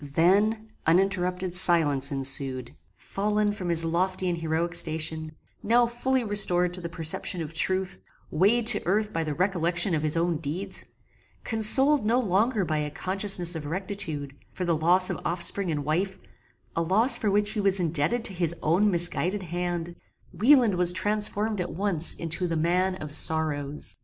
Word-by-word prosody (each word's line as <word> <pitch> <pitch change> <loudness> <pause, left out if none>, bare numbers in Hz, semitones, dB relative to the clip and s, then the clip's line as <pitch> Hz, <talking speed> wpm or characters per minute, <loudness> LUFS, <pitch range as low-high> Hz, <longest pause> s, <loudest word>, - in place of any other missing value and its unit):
Then 200 +9 +1 0.2
uninterrupted 180 0 0
silence 155 -6 +2
ensued. 135 -2 -2 0.2
Fallen 210 +1 -1
from 185 -4 -5
his 165 -1 +1
lofty 185 +3 -1
and 175 - -2
heroic 165 +1 -2
station; 160 -1 -1 0.3
now 240 +2 +3
finally 245 +2 -1
restored 180 -4 +2
to 180 - -6
the 170 - -5
perception 165 +2 -1
of 155 +1 -8
truth; 185 - -1 0.3
weighed 210 +9 +2
to 240 - +6
earth 210 +3 0
by 165 - -1
the 150 -2 -4
recollection 175 0 0
of 155 - 0
his 155 +1 +1
own 170 -1 0
deeds; 170 +6 -2 0.6
consoled 265 +5 +3
no 230 +4 +2
longer 210 0 +1
by 155 -2 -1
a 150 0 -3
consciousness 185 +1 +1
of 150 -2 -6
rectitude, 165 -5 -4 0.2
for 185 - -5
the 170 -1 +1
loss 175 +4 +2
of - - -5
offspring 180 +2 -1
and 145 -3 -3
wife 185 +6 -1 0.6
a 165 - 0
loss 205 +10 +3
for 215 - 0
which 205 +1 +1
he 215 - -3
was 195 -1 +1
indebted 170 +7 0
to 195 - +4
his 170 -2 -1
own 180 +7 +2
misguided 180 +2 -2
hand; 175 0 -4 0.4
Wieland 245 -3 +4
was 180 -1 +2
transformed 210 +1 -1
at 175 -3 -5
once 175 -2 +1
into 170 +2 -2
the 165 -1 -2
man 180 +4 0
OF 155 -5 -8
SORROWS! 150 -2 0
180 Hz, 165 wpm, -26 LUFS, 160-205 Hz, 0.6 s, to